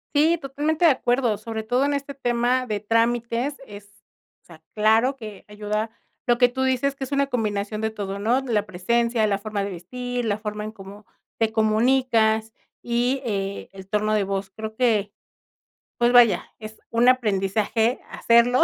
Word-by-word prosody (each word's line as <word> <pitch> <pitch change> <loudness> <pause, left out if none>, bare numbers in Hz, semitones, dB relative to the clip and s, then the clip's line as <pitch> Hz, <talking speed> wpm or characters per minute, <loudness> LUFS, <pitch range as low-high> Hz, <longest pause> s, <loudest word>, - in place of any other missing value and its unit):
Sí, 320 +4 +4
totalmente 300 +4 -1
de 325 - +7
acuerdo, 245 -4 +1
sobre 220 0 -5
todo 245 +5 +1
en 285 0 0
este 280 0 -4
tema 250 -1 0
de 210 -2 -2
trámites 235 +4 0
es 205 -2 -11 0.6
o - - -41
sea, 160 -2 -16
claro 220 +5 +3
que 215 -6 -10
ayuda, 210 +1 -3 0.4
lo 240 -1 +3
que 245 -1 +5
tú 260 +2 -4
dices 260 +1 +1
que 270 - -5
es 260 - -13
una 280 0 +1
combinación 215 -4 -2
de 220 - 0
todo, 200 -2 -5
¿no? 230 +5 +2
la 225 -6 -1
presencia, 230 +5 +1
la 200 -2 0
forma 205 -1 -3
de 200 - -4
vestir, 245 +7 -5
la 210 -2 0
forma 210 0 -5
en 215 - -5
cómo 200 0 -13 0.3
te 225 -1 +2
comunicas 220 0 +2 0.3
y, 245 +3 0
eh, 200 -3 -3
el 190 -1 -12
torno 215 +1 0
de 210 -1 +2
voz, 195 0 -3
creo 220 +2 -7
que 220 -4 +1 0.9
pues, 240 0 +3
vaya, 240 -3 +5
es 215 0 -10
un 235 +1 +2
aprendizaje 220 0 +1
hacerlo, 235 +2 +4
225 Hz, 175 wpm, -23 LUFS, 210-250 Hz, 0.9 s, de